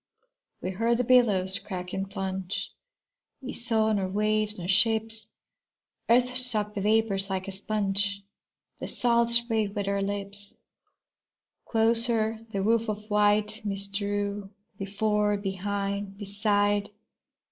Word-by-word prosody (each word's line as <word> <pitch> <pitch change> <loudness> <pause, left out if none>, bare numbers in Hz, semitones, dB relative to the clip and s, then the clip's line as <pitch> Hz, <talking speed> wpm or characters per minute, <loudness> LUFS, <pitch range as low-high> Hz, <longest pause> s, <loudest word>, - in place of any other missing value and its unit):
We 185 - -2
heard 230 +5 +1
the 250 - +1
billows 205 -7 +3
crack 180 -2 -6
and 195 0 -3
plunge, 190 -1 -3 0.7
We 260 - -6
saw 220 -2 +1
nor 195 -2 0
waves 215 +2 0
nor 175 -1 -5
ships. 220 +3 +2 0.8
Earth 250 +1 +4
sucked 215 -5 -1
the 200 - -3
vapors 205 -2 +1
like 190 0 -3
a - - -4
sponge, 200 0 0 0.6
The - - -5
salt 235 -1 +2
spray 235 -2 +3
wet 200 0 -4
our 200 0 0
lips. 200 0 -5 1.1
Closer 225 -1 +1
the 195 -2 -1
woof 230 +1 +2
of 210 0 -5
white 210 +1 +2
mist 200 -1 -4
drew, 205 -1 -2 0.3
Before, 210 +1 0
behind, 200 0 -3
beside. 205 0 0
205 Hz, 125 wpm, -27 LUFS, 195-220 Hz, 1.1 s, Earth